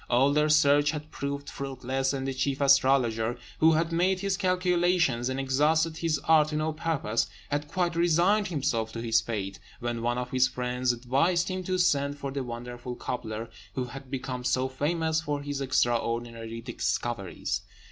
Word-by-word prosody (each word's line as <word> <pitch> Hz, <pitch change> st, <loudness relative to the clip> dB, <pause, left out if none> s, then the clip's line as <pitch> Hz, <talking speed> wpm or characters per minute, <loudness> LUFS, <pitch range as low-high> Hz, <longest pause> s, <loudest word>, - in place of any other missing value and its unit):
All 130 Hz, +3 st, +4 dB
their 150 Hz, +1 st, +3 dB
search 145 Hz, -1 st, +5 dB
had 150 Hz, 0 st, -4 dB
proved 140 Hz, 0 st, -4 dB
fruitless, 135 Hz, -1 st, -2 dB
and 135 Hz, -1 st, -3 dB
the 135 Hz, -, -1 dB
chief 135 Hz, +1 st, -1 dB
astrologer, 130 Hz, -5 st, +3 dB, 0.2 s
who 160 Hz, +1 st, +6 dB
had 165 Hz, +1 st, +1 dB
made 185 Hz, +3 st, +2 dB
his 195 Hz, -1 st, 0 dB
calculations 180 Hz, -, +2 dB
and 130 Hz, +1 st, -2 dB
exhausted 155 Hz, +4 st, +2 dB
his 165 Hz, -2 st, 0 dB
art 155 Hz, -2 st, +6 dB
to 155 Hz, -, -4 dB
no 155 Hz, +1 st, 0 dB
purpose, 150 Hz, -8 st, -1 dB, 0.2 s
had 145 Hz, +1 st, -1 dB
quite 175 Hz, +1 st, -1 dB
resigned 175 Hz, +5 st, +3 dB
himself 130 Hz, -9 st, -1 dB
to 115 Hz, -, -4 dB
his 115 Hz, -1 st, +3 dB
fate, 100 Hz, -4 st, -4 dB, 0.2 s
when 120 Hz, -1 st, -3 dB
one 120 Hz, +1 st, 0 dB
of 125 Hz, 0 st, -4 dB
his 130 Hz, 0 st, +4 dB
friends 125 Hz, -1 st, -1 dB
advised 140 Hz, +10 st, +1 dB
him 185 Hz, 0 st, -3 dB
to 185 Hz, 0 st, 0 dB
send 145 Hz, -5 st, +2 dB
for 140 Hz, -1 st, -4 dB
the 140 Hz, 0 st, -3 dB
wonderful 120 Hz, +1 st, -6 dB
cobbler, 115 Hz, -2 st, -5 dB, 0.2 s
who 130 Hz, -, -1 dB
had 130 Hz, +2 st, -9 dB
become 130 Hz, -1 st, -4 dB
so 130 Hz, +1 st, +1 dB
famous 160 Hz, +4 st, 0 dB
for 145 Hz, -2 st, -3 dB
his 145 Hz, -1 st, -3 dB
extraordinary 115 Hz, -3 st, -1 dB
discoveries. 120 Hz, -4 st, -2 dB
135 Hz, 170 wpm, -28 LUFS, 125-160 Hz, 0.2 s, who